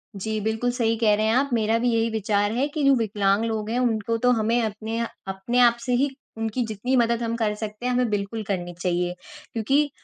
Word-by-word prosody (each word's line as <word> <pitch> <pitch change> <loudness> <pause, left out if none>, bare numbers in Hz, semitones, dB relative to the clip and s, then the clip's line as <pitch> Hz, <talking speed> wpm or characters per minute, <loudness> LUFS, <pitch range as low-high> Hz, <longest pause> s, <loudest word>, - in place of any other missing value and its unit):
जी, 215 +2 -3
बिल्कुल 220 +3 0
सही 230 -2 +1
कह 220 -2 +3
रहे 215 +1 0
हैं 220 - +2
आप। 275 +2 +2
मेरा 225 -1 +2
भी 245 +1 +1
यही 230 0 +1
विचार 205 -1 0
है 250 +5 0
कि 295 0 -3
जो 275 0 +6
विकलांग 205 -2 +1
लोग 220 -1 -2
हैं 240 +2 0
उनको 230 -2 0
तो 250 - +6
हमें 230 0 +2
अपने 220 +1 -3 0.3
अपने 195 +6 -1
आप 240 -1 +6
से 250 - 0
ही 285 - +2 0.3
उनकी 225 +2 -1
जितनी 220 +4 -2
मदद 235 0 +2
हम 230 0 -1
कर 220 -3 0
सकते 215 +2 -6
हैं, 250 - +1
हमें 245 -1 +1
बिल्कुल 210 +2 -2
करनी 180 -3 -3
चाहिए। 175 0 -1 0.4
क्योंकि 275 +7 +2
225 Hz, 220 wpm, -24 LUFS, 210-240 Hz, 0.4 s, जो